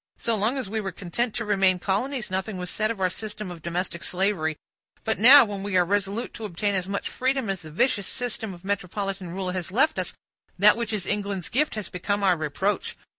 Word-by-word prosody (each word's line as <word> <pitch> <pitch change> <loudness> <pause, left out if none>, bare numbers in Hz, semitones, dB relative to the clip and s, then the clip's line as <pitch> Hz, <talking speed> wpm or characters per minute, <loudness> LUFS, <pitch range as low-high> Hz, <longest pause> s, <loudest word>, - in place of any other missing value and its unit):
So 230 - 0
long 220 +6 +1
as 260 - -3
we 220 +2 -2
were 195 -2 -3
content 210 +6 -3
to 235 - -2
remain 195 -3 +4
colonies, 215 +5 -2
nothing 190 +2 -2
was 180 -1 -5
said 215 0 0
of 230 -3 -3
our 185 - +3
system 210 -1 -5
of 170 -2 -9
domestic 170 0 -3
slavery; 180 -5 0 0.5
but 220 - 0
now, 260 +4 +10
when 205 -2 -5
we 200 -1 0
are 180 - +4
resolute 200 +4 -1
to 225 - -6
obtain 205 +2 -1
as 185 -1 -1
much 200 0 -2
freedom 260 -4 0
as 195 - -4
the 155 - -10
vicious 200 - +1
system 235 -4 -2
of 175 0 -12
metropolitan 195 -1 -3
rule 185 +1 -3
has 185 0 -4
left 290 +9 +2
us, - - -2 0.4
that 205 +3 +7
which 235 -2 -3
is 210 -4 -1
England's 200 -3 -2
gift 295 +2 +1
has 210 -4 -3
become 200 +3 -2
our 185 -2 +5
reproach. 160 +6 -2
200 Hz, 220 wpm, -25 LUFS, 185-220 Hz, 0.5 s, now